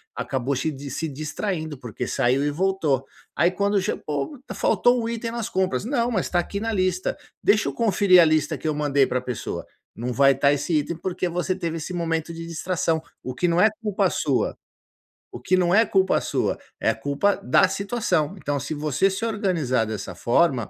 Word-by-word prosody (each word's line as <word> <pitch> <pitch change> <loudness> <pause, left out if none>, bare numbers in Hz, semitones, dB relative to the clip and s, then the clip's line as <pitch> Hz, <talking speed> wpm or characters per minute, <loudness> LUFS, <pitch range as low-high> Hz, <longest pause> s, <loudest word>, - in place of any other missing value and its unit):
acabou 130 +1 -2
chi 135 +5 -1
di 140 0 -8
se 160 - -2
distraindo 155 +2 -4
porque 125 -1 -5
saiu 130 +3 +1
e 145 - +1
voltou, 155 -6 0 0.3
aí 170 +4 +4
quando 200 +2 +1
che 195 - -1
"pô, 145 - -4 0.2
faltou 245 - +3
um - - -2
item 230 0 -3
nas 235 -2 -3
compras", 190 +1 0
"não, 240 -1 0
mas 190 -5 0
está 175 - -1
aqui 200 +3 -3
na 225 +1 -2
lista, 185 -1 0 0.3
deixa 210 +1 +3
eu - - -6
conferir 200 -5 +5
a - - +6
lista 155 -1 +1
que - - -5
eu 155 - +1
mandei 145 -2 +2
para 125 - -1
pessoa". 125 -2 -5 0.3
Não 120 +3 -3
vai 135 +1 +5
tá 140 +2 +3
esse 145 +4 -2
item, 160 +3 -4
porque 180 +1 -2
você 180 +2 -1
teve 170 -3 -3
esse 165 +3 -5
momento 165 -1 -2
de 165 0 -7
distração, 165 -1 -1 0.2
o 130 - -4
que 175 - +1
não 170 0 +2
é 215 - +6
culpa 200 -3 +1
sua, 140 -6 0 0.7
o - - -8
que 175 +9 +1
não 180 -1 +2
é 225 +3 +6
culpa 190 -3 +2
sua, - - -1 0.2
é - - +3
a - - -5
culpa 145 - +1
da 130 +9 +5
situação, 190 -5 -1
então 145 -5 -2
se 145 - -4
você 150 +3 +1
se 195 +4 -4
organizar 175 - 0
dessa 100 -4 -5
forma, 120 - +2
170 Hz, 205 wpm, -24 LUFS, 140-195 Hz, 0.7 s, a